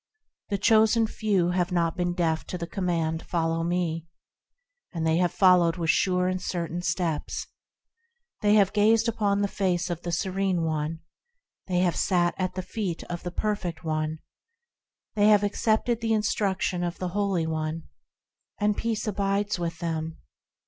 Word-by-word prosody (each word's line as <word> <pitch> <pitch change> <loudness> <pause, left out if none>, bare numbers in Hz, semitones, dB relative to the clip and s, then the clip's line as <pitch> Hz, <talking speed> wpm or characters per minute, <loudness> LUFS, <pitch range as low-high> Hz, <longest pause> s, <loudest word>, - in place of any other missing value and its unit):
The 200 - 0
Chosen 220 +2 +4
Few 200 -5 0
have 180 0 0
not 170 -2 +1
been 175 -1 -1
deaf 160 -3 0
to 180 - -4
the 170 - -4
command, 165 -3 -1
"Follow 165 -1 -1
Me", 170 -1 -1 0.8
And 165 -2 -3
they 160 0 +3
have 175 0 +2
followed 180 -3 +4
with 165 -1 +2
sure 180 +1 +1
and 185 0 -1
certain 175 -1 -3
steps. 170 -3 -2 1.0
They 210 0 +4
have 200 -3 +4
gazed 220 +2 +4
upon 205 -3 +1
the - - +2
face 185 -3 -1
of 170 -1 -4
the 175 - -4
Serene 190 0 0
One; 160 0 -2 0.7
They 180 -1 +1
have 175 -3 +2
sat 175 -2 +2
at 185 -1 -1
the 185 - -3
feet 185 -4 -4
of 175 - -4
the 175 - -4
Perfect 185 -4 -3
One; 155 0 -1 1.0
They 210 -1 +3
have 210 -1 +5
accepted 220 +3 +1
the 225 -1 +1
instruction 200 -4 0
of 175 -1 -3
the 185 - -3
Holy 195 -3 0
One, 160 0 -3 0.8
And 210 0 +2
peace 225 0 -2
abides 200 -1 0
with 170 -1 -3
them. 160 -1 -3
180 Hz, 160 wpm, -26 LUFS, 165-200 Hz, 1.0 s, have